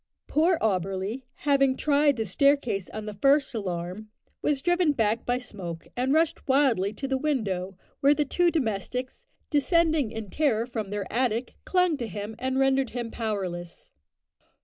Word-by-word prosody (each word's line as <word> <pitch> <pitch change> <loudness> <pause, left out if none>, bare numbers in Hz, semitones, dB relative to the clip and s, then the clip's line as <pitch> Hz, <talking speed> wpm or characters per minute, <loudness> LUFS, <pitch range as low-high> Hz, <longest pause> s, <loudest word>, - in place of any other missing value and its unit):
Poor 330 +3 +2
Auberly, 195 +4 -1 0.2
having 275 -2 +3
tried 290 -1 +3
the 225 -2 -2
staircase 235 -3 +1
on 215 0 -6
the 210 - -5
first 275 +7 +3
alarm, 185 0 -4 0.3
was 285 -2 0
driven 350 -3 +3
back 225 -3 0
by 245 0 +2
smoke, 180 -9 -7
and 255 +2 0
rushed 320 +2 +1
wildly 260 -8 +3
to 270 +6 -5
the 265 0 0
window, 195 -11 -1 0.2
where 280 +1 +5
the 295 - +1
two 350 +5 +2
domestics, 250 - -3 0.2
descending 315 - +2
in 215 -3 -7
terror 250 -7 +1
from 225 -5 -4
their 205 -1 -3
attic, 240 0 0
clung 360 -4 +2
to 240 -4 -4
him 205 +2 -6
and 260 0 -1
rendered 270 -1 +2
him 235 -2 -3
powerless. 185 -6 -4
245 Hz, 155 wpm, -27 LUFS, 210-285 Hz, 0.3 s, where